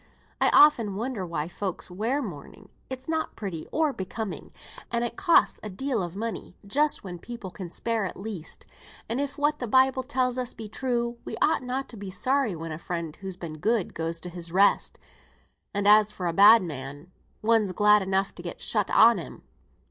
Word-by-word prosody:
"I - - +5
often 235 -10 +5
wonder 220 -3 -3
why 160 -2 -3
folks 185 0 -5
wear 230 +10 -1
mourning; 195 - -9 0.2
it's 260 0 -7
not 320 -1 -2
pretty 185 -7 -5
or 310 -3 +1
becoming; 200 +2 -6 0.4
and 235 0 0
it 240 - -4
costs 385 -4 +3
a 215 - -5
deal 235 +3 -2
of 175 0 -5
money 220 -3 -5
just 290 +9 +1
when 175 -3 -7
people 235 -2 -8
can 185 -1 -7
spare 225 +3 -1
it - - -5
least; 195 -5 -6 0.4
and 240 +4 -1
if 280 -1 -4
what 295 +1 +1
the 245 - -3
Bible 260 +2 +4
tells 255 0 0
us 250 -1 -3
be 220 -1 -7
true, 235 +1 -2
we - - -5
ought - - +2
not 255 +2 -3
to 230 - -9
be 200 -1 -7
sorry 255 +2 0
when 165 0 -6
a 155 - -5
friend, 170 -3 -5
who's 190 -2 -7
been 160 -4 -7
good, 220 +1 0
goes 165 +1 -2
to 180 - -5
his 170 -1 -6
rest; 195 +3 +3 0.7
and 200 0 -1
as 210 0 +7
for 195 -4 -6
a 170 - 0
bad 205 +4 +8
man, 145 +1 -7 0.3
one's 220 -3 +3
glad 210 +2 +5
enough 190 0 0
to - - -10
get 175 -1 -6
shut 210 -3 0
on 230 +1 +6
him. - - -9
210 Hz, 195 wpm, -26 LUFS, 180-245 Hz, 0.7 s, bad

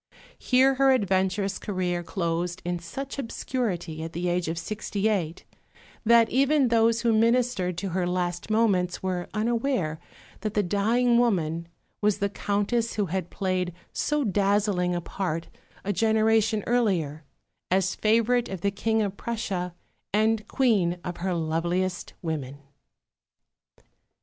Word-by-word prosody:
Here 265 +1 +4
her 270 +1 +3
adventurous 195 -2 +1
career 180 -3 -2
closed 175 0 -2
in 175 0 -1
such 270 +12 -6
obscurity, 210 - -3
at 165 +1 -6
the 175 +1 -1
age 175 -1 0
of 165 +1 -2
sixty 205 +3 -2
eight, 180 -6 -1 0.6
that 230 0 +6
even 275 0 +3
those 230 0 +3
who 235 -1 +2
ministered 230 -5 +2
to 195 +1 -3
her 180 0 -1
last 180 +1 -2
moments 200 -6 +1
were 180 -2 -2
unaware 225 - 0 0.4
that 215 -2 -4
the 210 - +3
dying 230 +6 +2
woman 170 -8 +1 0.3
was 210 -1 +2
the 200 -1 0
Countess 205 +4 -1
who 210 - +1
had 185 -3 -2
played 185 -2 -1 0.2
so 300 -1 0
dazzling 200 -3 +1
a 175 - -2
part 165 -2 -3 0.4
a 205 - 0
generation 220 0 +2
earlier, 180 -11 0 0.5
as 185 0 +2
favourite 230 +3 +2
of 190 -3 -5
the 200 - +1
King 220 +2 0
of 200 -1 -3
Prussia 190 -6 -3 0.4
and 215 +1 +2
Queen 200 -10 +2
of 175 -1 -4
her 180 0 -1
loveliest 170 +3 -1
women. 145 -5 -3
200 Hz, 135 wpm, -26 LUFS, 175-225 Hz, 0.6 s, that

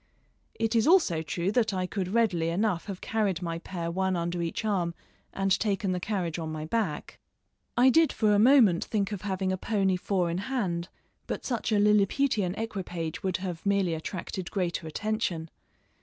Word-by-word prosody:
It 225 +1 -1
is 225 +2 +3
also 310 - +4
true 170 +4 -2
that 220 -3 +1
I 185 0 0
could 185 0 -3
readily 190 -6 +1
enough 185 0 0
have 195 -3 -6
carried 205 -5 -1
my 165 -1 -3
pair 170 -1 -4
one 190 +1 0
under 170 0 -2
each 170 +6 -3
arm, 180 -5 0 0.4
and 195 0 -1
taken 200 -2 0
the 180 - -1
carriage 180 -4 -2
on 160 -1 -4
my 155 0 -4
back. 190 -5 -2 0.6
I 255 +2 +6
did 325 +3 +4
for 215 -2 +2
a 205 - +4
moment 225 -7 +6
think 205 -2 -1
of 200 -3 -4
having 190 -2 -1
a 185 - -1
pony 195 -2 +1
four 180 -2 0
in 170 - -2
hand, 190 -7 -2 0.4
but - - -4
such 235 -3 -2
a 215 - +3
Liliputian 210 0 +2
equipage 180 -7 -4
would 190 -2 -1
have 175 -3 -5
merely 200 -4 +2
attracted 175 +3 -5
greater 175 -4 -2
attention. 175 -3 -2
190 Hz, 180 wpm, -28 LUFS, 170-215 Hz, 0.6 s, I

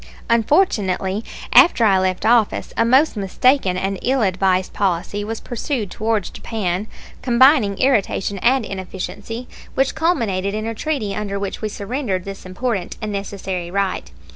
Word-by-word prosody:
Unfortunately, 215 - +2 0.3
after 240 -9 +7
I 195 -3 +4
left 185 +1 -1
office, 225 -2 +2
a - - +3
most 265 +6 +4
mistaken 200 0 +2
and 195 0 -2
ill 260 -1 +1
advised 185 -1 +1
policy 195 +2 -1
was 225 +1 -4
pursued 240 -4 -3
towards 220 -3 -1
Japan, 200 -2 -3 0.3
combining 245 -4 +4
irritation 205 -6 +1
and 250 +3 +2
inefficiency, 195 +5 -6 0.3
which 270 0 +2
culminated 220 - 0
in 215 0 -3
a 225 - -2
treaty 225 -4 -2
under 200 -1 -3
which 200 -1 -4
we 215 - -2
surrendered 205 -2 -3
this 195 -1 -8
important 195 0 -3
and 215 -2 -4
necessary 195 -3 -4
right. 195 0 -2
205 Hz, 140 wpm, -20 LUFS, 190-240 Hz, 0.3 s, after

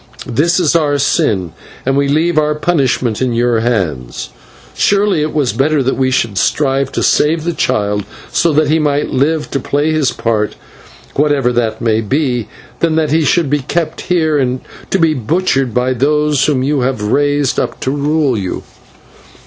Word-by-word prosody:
This 170 +9 +1
is 170 -3 +2
our 150 -3 +2
sin, 100 - 0 0.3
and 135 +1 +1
we 140 0 +2
leave 155 +3 +2
our 150 0 +1
punishment 135 -8 0
in 130 -2 0
your 120 0 +1
hands. 85 - -2 0.4
Surely 200 -4 +2
it 155 0 -1
was 140 -8 0
better 140 +4 +1
that 130 - 0
we 130 -1 +1
should 115 -6 0
strive 135 0 0
to - - -1
save 155 +1 +2
the 175 +1 -1
child, 105 -6 0 0.3
so 170 - +2
that 155 0 +2
he 155 +2 +2
might 145 -1 0
live 150 +3 0
to 140 - -1
play 145 +4 0
his 155 -4 +1
part, 110 -2 -1 0.6
whatever 140 -4 +1
that 115 -2 -1
may 110 -1 +1
be, 125 0 -1 0.3
than 165 -2 +1
that 155 -2 +1
he 160 +1 +3
should 170 +1 +2
be 145 +2 +1
kept 155 +4 -2
here 160 -5 +1 0.5
to - - +1
be 165 -3 +3
butchered 135 0 0
by 125 +3 0
those 150 +2 +1
whom 135 -4 +1
you 145 +1 0
have 125 -4 -1
raised 145 +4 +1
up - - -3
to 130 - -1
rule 145 -1 +1
you." 95 -4 -4
140 Hz, 175 wpm, -15 LUFS, 120-155 Hz, 0.6 s, he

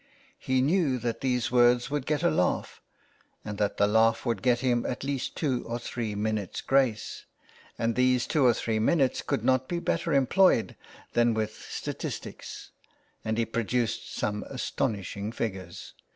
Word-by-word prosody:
He 130 -1 +1
knew 150 -3 +2
that 120 -1 -3
these 125 -3 0
words 120 +1 +4
would 145 -2 -2
get 150 +1 0
a 170 - +4
laugh, 90 - 0 0.6
and 105 -1 -5
that 105 -1 0
the 100 - +4
laugh 115 +3 +3
would 120 -2 -1
get 125 -2 +2
him 120 -2 +2
at 125 - -4
least 140 -2 -3
two 130 -6 0
or 115 +1 -2
three 115 -3 -4
minutes 105 -2 -2
grace, 130 -5 0 0.5
and 115 0 0
these 125 0 +3
two 150 - +1
or 125 -2 +6
three 110 -1 -1
minutes 135 +3 +2
could 110 - -2
not 130 0 +2
be 175 - -2
better 170 0 -1
employed 140 - +3 0.4
than 120 -1 +3
with 110 -1 -1 0.2
statistics, - - -6 0.5
and 110 0 -1
he 115 - +2
produced 115 0 -1
some 105 0 -2
astonishing 105 -6 -3
figures. 95 -5 -5
120 Hz, 160 wpm, -28 LUFS, 110-130 Hz, 0.6 s, or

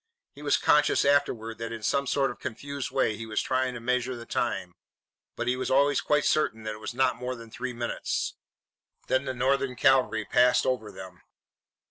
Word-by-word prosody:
He 145 - -13
was 145 -1 +2
conscious 150 -1 +3
afterwards 115 -6 +1
that 115 0 -4
in 115 -1 -7
some 140 +4 +1
sort 140 0 +1
of - - -12
confused 140 +3 -5
way 130 -5 +1
he 115 +2 -7
was 110 - -1
trying 130 -1 0
to - - -5
measure 125 +1 -1
the 115 -1 -9
time. 95 -9 -2 0.6
But 120 - -3
he 125 - +2
was 130 - -3
always 140 +1 +3
quite 150 -1 +1
certain 110 -8 +1
that 110 0 -3
it 105 - -10
was 110 +2 -6
not 130 0 +2
more 125 +1 -4
than 115 -1 -12
three 125 +2 -4
minutes. 120 -1 -2 0.7
Then 130 +1 +1
the 130 - -2
Northern 135 +1 +1
cavalry 120 -4 +3
passed 125 +1 +4
over 115 -5 -1
them. 95 -2 -11
125 Hz, 195 wpm, -27 LUFS, 115-135 Hz, 0.7 s, passed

